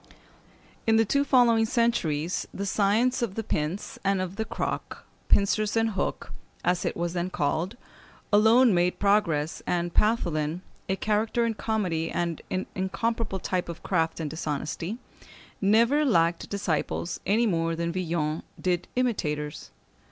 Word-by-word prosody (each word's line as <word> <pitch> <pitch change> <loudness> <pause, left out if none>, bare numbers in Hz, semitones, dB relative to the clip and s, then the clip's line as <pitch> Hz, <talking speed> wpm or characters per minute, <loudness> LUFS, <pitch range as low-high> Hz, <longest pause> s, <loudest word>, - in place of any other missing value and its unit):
In 225 - +5
the 225 0 +4
two 280 +7 +2
following 240 -5 +4
centuries 185 - 0
the 200 - -4
science 215 +6 +2
of 215 -5 -2
the 225 - -2
pince 160 +3 -3
and 195 0 +2
of 185 0 -3
the 220 +1 -2
croc - - -4 0.2
(pincers 210 +2 +2
and 225 0 +2
hook), 195 - -3 0.3
as 180 0 +1
it - - -2
was 170 0 -2
then 175 0 -1
called, 175 +7 -1 0.6
alone 220 +3 +6
made 175 0 +2
progress, 170 -7 +1
and 175 -1 -1
Pathelin 170 -7 +1 0.3
(a 190 - +2
character 215 +3 +1
in 230 - 0
comedy, 185 -8 -1
and 170 -2 -2
an 185 - -2
incomparable 195 +3 -1
type 185 -1 -2
of 170 - -7
craft 165 -4 0
and 160 - -2
dishonesty) 160 +5 -3 0.6
never 230 +9 +4
lacked 170 - +2
disciples 175 -3 -2
any 220 +4 +3
more 165 -5 0
than 170 0 -2
Villon 165 -3 -1 0.2
did 180 -1 0
imitators. 150 -12 -1
190 Hz, 145 wpm, -27 LUFS, 170-220 Hz, 0.6 s, alone